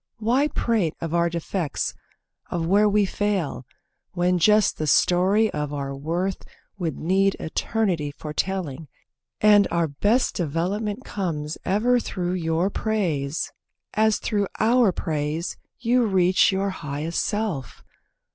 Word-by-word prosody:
Why 245 +6 +2
prate 220 - 0
of 165 -1 -4
our 170 0 +2
defects, 170 -1 -2 0.6
of 170 -2 -2
where 205 +4 +4
we 205 0 +3
fail, 190 - -2 0.5
When 180 0 +1
just 210 +4 +4
the 155 - -1
story 190 +8 +3
of 150 -1 -3
our 140 -1 -4
worth 170 +7 -2 0.4
would 165 -6 -2
need 195 +4 +2
Eternity 175 -3 -1
for 150 +1 -8
telling, 165 -6 -3 0.5
and 205 -2 +6
our 170 -1 +1
best 205 - +1
Development 195 - -2
comes 160 -6 -3
ever 240 +6 +3
through 180 -5 -3
your 170 +2 0
praise, 165 -11 -1 0.4
As 220 0 +3
through 205 -3 -1
our 230 -1 +4
praise 155 +1 -2 0.2
you 245 0 +2
reach 185 -1 +4
your 195 +1 0
highest 150 -1 -3
self? 205 - -3
185 Hz, 130 wpm, -24 LUFS, 160-210 Hz, 0.6 s, and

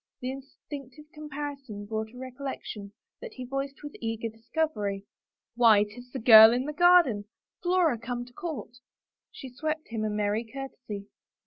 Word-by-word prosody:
The 255 +1 -3
instinctive 275 +1 -10
com 300 0 -9
parison 275 -8 -6
brought 220 0 -3
a 250 - -14
recollection 255 -6 -7 0.3
that - - -8
he 255 - -6
voiced 275 +2 -4
with 290 - -7
eager 225 0 -2
discovery. 220 -4 -2 0.2
" - - -64
Why, 225 -4 +6
'tis 245 +4 -11
the 265 - -4
girl 220 -2 +10
in 250 +2 0
the 300 - -4
garden 340 - +5 0.2
— - - -65
Flora 350 -8 +2
come 240 +1 -4
to 245 - -17
court! 315 -9 -6 0.3
" - - -65
She 270 - -9
swept 310 +3 -3
him 225 -2 -3
a 215 - 0
merry 210 +1 0
courtesy. 230 -4 -7
250 Hz, 175 wpm, -28 LUFS, 220-290 Hz, 0.3 s, girl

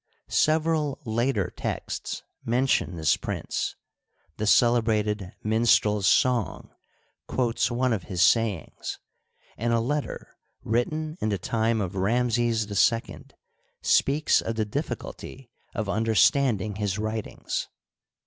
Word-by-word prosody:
Several 155 -2 +2
later 110 -5 0
texts - - -4 0.2
mention 120 -6 +1
this 80 -3 +2
prince; - - -3 0.6
the 110 - -2
celebrated 110 -4 +2
" - - -40
Minstrel's 105 -2 +3
Song 125 -4 +2 0.3
" - - -42
quotes 120 -3 0
one 125 0 +1
of 95 -6 -3
his 90 -1 +1
sayings, 110 -5 +1 0.6
and 115 +2 0
a 115 - +3
letter 145 +5 -3 0.2
written 155 +8 -1
in 110 - 0
the 100 - 0
time 110 +4 0
of 95 -1 -3
Ramses 115 0 +2
H 115 0 -6 0.6
speaks 145 +3 +3
of 115 - -3
the 110 -1 0
difficulty 115 +4 -6 0.2
of 110 - -2
under 110 +2 0
standing 110 -5 +3
his 105 -2 -1
writings. 110 0 -3
115 Hz, 120 wpm, -26 LUFS, 105-125 Hz, 0.6 s, Minstrel's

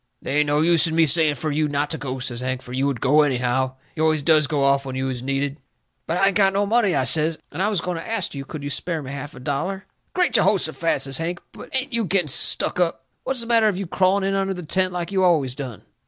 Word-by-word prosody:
"They 140 - -3
ain't 150 - +2
no 145 +1 +2
use 165 0 +5
in 160 - -3
me 165 0 +5
saying 155 -1 +2
fur 155 +4 -3
you 150 +1 +1
not 145 0 -1
to 160 - -2
go," 135 -2 -4
says 125 -2 -4
Hank, 130 0 -3
"fur 125 - -11
you 135 +2 0
would 135 -5 -3
go 145 +3 +4
anyhow. 130 -1 0 0.2
You 155 - -3
always 155 -2 +2
does 155 -1 +4
go 145 -2 0
off 140 0 +3
when 130 -1 -6
you 130 0 -2
is 125 -2 -4
needed." 140 +2 -2 0.5
"But 165 - -1
I 195 - +3
ain't 195 - -4
got 195 -1 +3
no 200 +1 +1
money," 210 -4 +2
I 135 - +2
says, 155 +3 +3
"and 160 - -4
I 205 - +2
was 200 -6 -1
going 180 0 -3
to 165 - -7
ast 225 -5 -1
you 140 -1 -5
could 145 +1 -8
you 145 - -4
spare 165 0 -3
me 130 - -7
half 140 +1 -7
a - - -10
dollar?" 150 +9 -3 0.3
"Great 360 -1 +2
Jehosephat!" 165 -6 +1
says 135 +1 -1
Hank, 175 +2 -3
"but - - -12
ain't 265 0 -1
you 230 -2 +1
getting 185 -5 +1
stuck 135 - +2
up! 165 -7 0 0.2
What's 265 -2 -1
the - - -5
matter 230 -2 +4
of 200 -4 0
you 195 - -3
crawling 190 +3 +1
in 195 0 0
under 195 -1 -1
the 180 - -7
tent 185 +4 +1
like 175 0 -4
you 190 -1 +1
always 155 -8 +2
done? 130 -5 -7
155 Hz, 275 wpm, -22 LUFS, 140-185 Hz, 0.5 s, use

